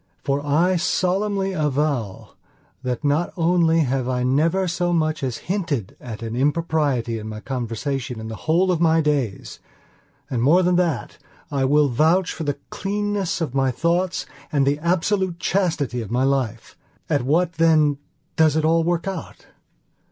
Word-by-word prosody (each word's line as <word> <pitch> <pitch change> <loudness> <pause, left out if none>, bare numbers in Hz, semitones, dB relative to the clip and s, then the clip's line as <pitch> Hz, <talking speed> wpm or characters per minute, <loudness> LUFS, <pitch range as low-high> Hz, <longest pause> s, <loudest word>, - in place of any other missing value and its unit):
For 140 +1 -1
I 165 +6 +2
solemnly 195 +3 0
avow 145 - -1 0.5
that 125 +2 -3
not 150 +4 +1
only 165 -1 +3
have 130 -3 0
I 125 -1 0
never 165 +9 +2
so 175 0 -1
much 155 -2 0
as 130 -3 -2
hinted 165 - -2
at 115 -2 -7
an 115 0 -4
impropriety 145 -5 0
in 110 0 -7
my 105 0 -6
conversation 125 +1 -4
in 110 - -6
the 110 - -5
whole 180 +4 +3
of 170 -2 0
my 165 -1 +4
days; 145 -9 -1 0.7
and 120 -3 -2
more 165 +9 +5
than 180 0 +2
that, 175 -4 -1 0.3
I 135 -2 +1
will 145 +2 +4
vouch 160 +8 +2
for 160 - -5
the 145 -1 -1
cleanness 205 -2 -2
of 155 -6 -2
my 135 -1 +2
thoughts 170 +7 0 0.3
and 140 -3 +2
the 140 +2 +1
absolute 180 +2 0
chastity 165 -10 0
of 110 - -7
my 125 +3 +1
life. 130 -5 -1 0.3
At - - +1
what, 165 +7 +1
then, 155 -3 +4 0.4
does 155 -2 +4
it 155 0 +1
all 165 +1 +3
work 175 +2 -1
out? 190 -3 -6
155 Hz, 160 wpm, -22 LUFS, 130-175 Hz, 0.7 s, more